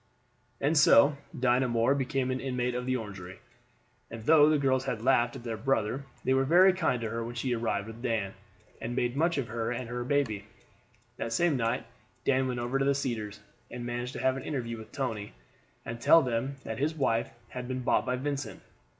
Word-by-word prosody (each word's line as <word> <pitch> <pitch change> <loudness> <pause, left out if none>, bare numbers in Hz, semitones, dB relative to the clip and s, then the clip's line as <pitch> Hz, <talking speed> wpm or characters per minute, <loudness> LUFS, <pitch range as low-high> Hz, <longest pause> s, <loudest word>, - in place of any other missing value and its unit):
And 145 +4 +1
so 140 0 +6 0.2
Dinah 125 0 +3
Moore 120 +2 +2
became 135 -1 -1
an 130 - -1
inmate 125 -2 -1
of 125 +1 -3
the 130 - +1
Orangery; 95 -5 -8 0.7
and 115 -1 -8
though 150 +2 +6
the 155 - +4
girls 135 -2 +1
had 115 -5 -3
laughed 120 -2 +3
at - - -8
their 115 -2 -3
brother, 135 +1 0 0.2
they 130 - +2
were 135 0 +3
very 180 +7 +6
kind 165 -9 0
to 115 - -2
her 115 0 -2
when 120 +1 -6
she 125 +1 -1
arrived 110 -4 -1
with 115 +1 -10
Dan, 110 -6 -1 0.5
and 120 +1 -4
made 120 0 0
much 165 +3 +1
of 125 -5 -2
her 115 0 -2
and 125 +1 -3
of 115 - -10
her 120 0 -3
baby. 120 -7 0 0.7
The - - -3
same 155 +7 +2
night 115 -2 -1 0.4
Dan 130 -1 +2
went 125 -1 -2
over 120 +3 -1
to 135 - +1
the 140 0 +3
Cedars, 110 -6 -3 0.3
and 120 -1 -6
managed 120 +1 -3
to - - -5
have 130 0 +2
an 130 - -6
interview 115 -6 -3
with 110 - -11
Tony, 115 - -3 0.5
and 115 0 -5
to - - -11
tell 165 -1 +7
him 125 +2 -2
that 110 0 -5
his 155 +3 0
wife 115 -6 +1 0.2
had 125 -1 -6
been 130 0 -3
bought - - +2
by 125 - +1
Vincent. 140 -2 -4
125 Hz, 215 wpm, -29 LUFS, 115-135 Hz, 0.7 s, tell